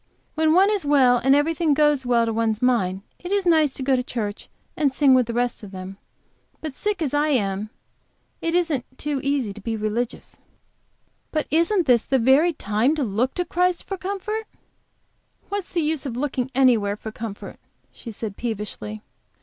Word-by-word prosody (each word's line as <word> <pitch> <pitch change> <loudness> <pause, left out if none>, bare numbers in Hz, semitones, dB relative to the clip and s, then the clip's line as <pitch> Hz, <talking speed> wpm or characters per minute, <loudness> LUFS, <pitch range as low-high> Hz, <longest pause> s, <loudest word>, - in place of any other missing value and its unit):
"When 315 0 +2
one 390 +3 +5
is 410 -3 0
well, 265 -4 +4
and 270 +2 +5
everything 310 +1 +2
goes 295 -3 +3
quite 240 -1 +3
to 225 - -2
one's 220 -1 0
mind, 200 -7 +1 0.2
it 360 - -7
is 400 -1 +1
nice 315 -4 +4
to 265 - -4
go 265 0 +3
to 250 - +1
church 220 -4 -5 0.3
and 295 -4 +2
sing 270 0 +4
with 255 -3 +4
the 235 - -3
rest 245 0 -1
of 205 - -9
them. 190 0 -8 0.6
But, 310 -3 -6
sick 415 +3 -2
as 285 - -2
I 295 +1 +2
am, 210 -7 0 0.7
it 330 +1 -1
isn't 325 -8 +1 0.2
so 295 -2 -2
easy 275 -7 -1
to 210 - -11
be 225 +2 -3
religious." 220 +3 -3 0.9
"But 310 -2 -1
isn't 335 +4 +2
this 240 -4 +4
the 270 - +2
very 265 +8 +4
time 225 +4 +1
to 300 - -1
look 240 +4 -1
to 355 - -1
Christ 360 0 0
for 390 - -4
comfort?" 400 +3 -4 1.0
"What's 405 -2 -4
the 340 - 0
use 305 -2 -1
of 240 -2 -5
looking 265 -2 -2
anywhere 230 -6 +3
for 220 +1 -8
comfort?" 220 -2 -8 0.3
she 235 - -10
said, 215 -2 -6
peevishly. 205 - -5
265 Hz, 185 wpm, -23 LUFS, 225-315 Hz, 1.0 s, one